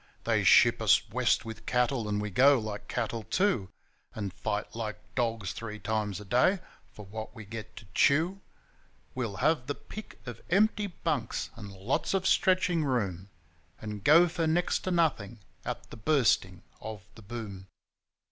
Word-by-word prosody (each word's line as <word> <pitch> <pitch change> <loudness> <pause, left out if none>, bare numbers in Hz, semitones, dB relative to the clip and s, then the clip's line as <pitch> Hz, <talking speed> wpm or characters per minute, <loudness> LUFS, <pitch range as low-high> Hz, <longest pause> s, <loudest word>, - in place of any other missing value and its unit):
They - - +1
ship - - +6
us - - +4
West - - +2
with 110 0 -9
cattle, 125 -2 +1
and 105 0 0
we 105 0 -3
go 135 +7 +6
like 110 -3 -5
cattle 115 -1 -2
too; 115 - 0 0.5
And 100 -4 -4
fight 105 +2 -3
like 110 -2 -4 0.2
dogs 115 -6 -1
three 110 -2 -6
times 105 -1 -2
a 105 - -10
day 125 - +3 0.3
for 105 - -11
what 110 +4 -7
we 110 -2 -9
get 110 +1 -8
to 110 - -11
chew.... 170 +7 +3 0.7
We'll 120 -6 -3
have 130 +4 +1
the 145 - -2
pick 215 - -10
of 120 -3 -8
empty 210 +2 +3
bunks 155 - -3
and 105 -3 -9
lots 100 - -1
of 190 -1 0
stretching 185 -4 +3
room, 100 - -1 0.5
And 105 -2 -6
go 165 +7 +7
for 165 -1 -1
next 175 +3 +1
to - - 0
nothing 150 - +1 0.3
at - - -6
the - - -9
Bursting 110 - +2 0.2
of 110 -3 -7
the 115 - -14
Boom. 100 -3 -7
115 Hz, 165 wpm, -29 LUFS, 105-155 Hz, 0.7 s, go